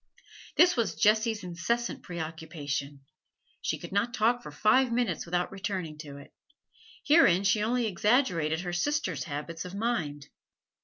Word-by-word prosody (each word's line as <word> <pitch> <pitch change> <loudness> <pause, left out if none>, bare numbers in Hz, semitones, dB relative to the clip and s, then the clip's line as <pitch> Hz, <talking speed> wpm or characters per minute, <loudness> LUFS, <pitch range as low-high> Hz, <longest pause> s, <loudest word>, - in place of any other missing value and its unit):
This 355 0 +6
was 235 -5 0
Jessie's 215 0 +2
incessant 210 +8 -2
preoccupation; 155 -4 -5 0.6
she - - -1
could - - -9
not 215 +5 0
talk 235 +3 +2
for - - -9
five 250 +4 +3
minutes 230 -9 -1
without 175 +1 -1
returning 190 -5 -4
to 145 -3 -9
it. 140 - -14 0.7
Herein 285 - +5
she 205 +1 +3
only 240 +3 +1
exaggerated 180 - +1
her 175 -1 -4
sisters' 290 +12 -1
habits 160 +1 -5
of 180 +1 -8
mind. 170 -11 -2
190 Hz, 140 wpm, -29 LUFS, 160-235 Hz, 0.7 s, This